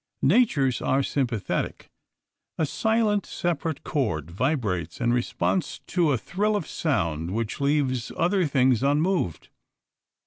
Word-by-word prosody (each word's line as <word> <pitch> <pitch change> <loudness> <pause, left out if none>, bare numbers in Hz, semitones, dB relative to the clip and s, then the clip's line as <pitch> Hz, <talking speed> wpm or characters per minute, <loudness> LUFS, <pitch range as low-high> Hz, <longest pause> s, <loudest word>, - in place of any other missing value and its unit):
Natures 140 - +3
are 135 +1 +2
sympathetic. 120 -7 -2 0.7
A 160 - +2
silent, 215 +3 +1
separate 165 -3 -2
chord 90 - -2
vibrates 100 - -1
in 120 0 +2
response 125 +8 -1
to 170 -5 +1
a 130 - +2
thrill 210 - -1
of 205 - -1
sound 85 - -1
which 115 +5 -3
leaves 140 -4 +1
other 180 0 +2
things 130 -4 +3
unmoved. 145 - 0
140 Hz, 115 wpm, -25 LUFS, 115-170 Hz, 0.7 s, Natures